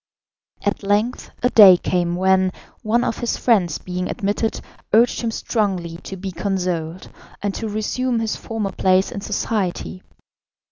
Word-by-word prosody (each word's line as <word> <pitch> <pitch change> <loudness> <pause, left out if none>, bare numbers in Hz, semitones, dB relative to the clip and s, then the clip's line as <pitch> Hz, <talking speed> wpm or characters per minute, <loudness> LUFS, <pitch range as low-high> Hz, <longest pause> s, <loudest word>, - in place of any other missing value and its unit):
At 205 - -1
length 210 +5 0
a 250 - +3
day 195 -5 +9
came 175 -1 -1
when, 190 0 +3 0.3
one 235 +3 +1
of 230 - -2
his 240 - -1
friends 190 -10 +2
being 180 0 -4
admitted, 210 0 -1 0.3
urged 235 +3 +4
him 230 - -1
strongly 190 -7 -2
to 190 +2 -8
be 190 +1 -5
consoled, 180 -2 -3 0.3
and 205 -1 -1
to 220 +2 -4
resume 230 +3 -1
his 225 -1 -1
former 220 -3 -4
place 185 0 +2
in 200 - -5
society. 195 -3 -2
200 Hz, 145 wpm, -21 LUFS, 185-220 Hz, 0.3 s, day